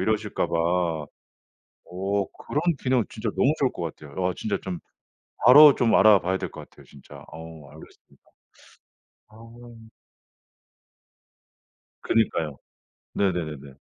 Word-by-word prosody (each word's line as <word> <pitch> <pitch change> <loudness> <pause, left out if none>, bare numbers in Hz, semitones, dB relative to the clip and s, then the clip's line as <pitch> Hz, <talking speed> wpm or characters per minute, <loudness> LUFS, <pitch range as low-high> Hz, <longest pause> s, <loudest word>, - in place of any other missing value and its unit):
이러실까 105 +1 -1
봐 85 -2 -1 0.9
어 100 +2 -1 0.2
그런 150 - -1 0.2
기능 130 -3 +1
진짜 110 0 -6
너무 140 - +3
좋을 135 - +2
것 85 -2 -5
같아요. 75 +5 -6
아 90 - +1
진짜 105 - -2
좀 90 -2 -6 0.7
바로 145 +3 +9
좀 115 -2 +1
알아 105 0 +6
봐야 95 +2 -1
될 - - -5
것 - - -11
같아요 - - -19
진짜. 70 - -17
어 80 -3 -12
알겠습니다. - - -18 1.1
아. 115 +1 -15 2.2
그니까요. 80 -10 0 0.6
네네네네. 75 -8 -3
95 Hz, 230 characters per minute, -24 LUFS, 80-115 Hz, 2.2 s, 바로